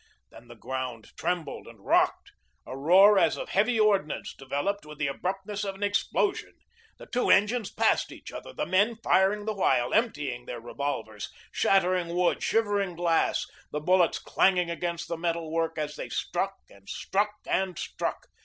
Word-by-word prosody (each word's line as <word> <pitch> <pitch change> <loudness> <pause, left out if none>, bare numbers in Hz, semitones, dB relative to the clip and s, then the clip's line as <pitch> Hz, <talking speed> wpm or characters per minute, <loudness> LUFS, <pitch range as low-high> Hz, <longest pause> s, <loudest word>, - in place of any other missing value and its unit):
Then 120 - -15
the 120 - -12
ground 125 -1 -5
trembled 170 -5 -3
and 115 -2 -13
rocked; - - +2 0.3
a 130 - -7
roar 190 +8 +6
as - - +3
of - - -6
heavy 220 +4 +2
ordnance 200 -8 +1
developed 145 +10 -3
with 150 0 -11
the 150 - -1
abruptness 195 +8 -3
of 195 -1 -3
an 200 - -6
explosion. 205 - 0 0.4
The - - -11
two 250 - -1
engines 215 +1 +3
passed - - +1
each - - -10
other, - - -8
the - - -3
men 205 +5 +2
firing 200 +2 +3
the 220 - -1
while, 125 -11 +1
emptying 145 - 0
their 120 - -5
revolvers, 115 -4 -4 0.2
shattering 180 -3 +2
wood, 180 0 +2
shivering 205 -5 +1
glass, 170 -1 +1 0.3
the 150 - -2
bullets 180 +2 +3
clanging 180 -3 +2
against 170 0 -3
the 170 - -3
metal 165 -1 -2
work 165 0 -1
as 150 -1 -3
they - - -6
struck - - -2
and 100 0 -18
struck 205 +2 -1
and 190 -2 -1
struck. - - -4
175 Hz, 165 wpm, -28 LUFS, 145-200 Hz, 0.4 s, roar